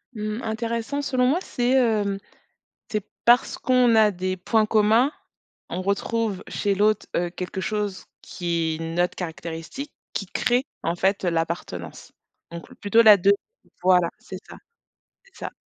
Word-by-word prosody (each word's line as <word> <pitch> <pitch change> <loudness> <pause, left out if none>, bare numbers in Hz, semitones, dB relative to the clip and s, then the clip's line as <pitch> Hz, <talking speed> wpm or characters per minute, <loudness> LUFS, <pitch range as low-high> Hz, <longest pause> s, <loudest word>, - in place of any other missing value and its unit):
Mmh, 215 +1 -3
intéressant 230 +5 -2
selon 255 -3 +1
moi 285 +8 +3
c'est, 245 -8 -1
hem, 215 -6 +2 0.7
c'est 210 -1 -2 0.2
parce 240 +2 +4
qu'on 250 -2 +3
a 220 -1 +6
des 185 0 -3
points 215 +4 +1
communs. 220 +6 +3 0.6
On 185 - -3
retrouve 200 +1 -1
chez 200 -1 0
l'autre, 210 +1 +2
heu, 175 0 0
quelque 180 +1 -5
chose 205 -2 -3 0.2
qui 170 -3 -2
est 165 - -6
notre 175 +1 +1
caractéristique, 170 - -6 0.2
qui 200 - -3
crée 245 +7 0 0.2
en 170 +1 -1
fait, 195 +2 +1
heu, 175 - +2
l'appartenance, 165 - -4 0.4
donc 170 +9 -9
plutôt 225 +1 +4
la 215 -2 +9
2, 200 +1 +4 0.5
voilà 180 -2 +4
c'est 185 - -9
ça, - - -10 0.7
c'est 485 - -26
ça. - - -7
205 Hz, 150 wpm, -24 LUFS, 180-230 Hz, 0.7 s, la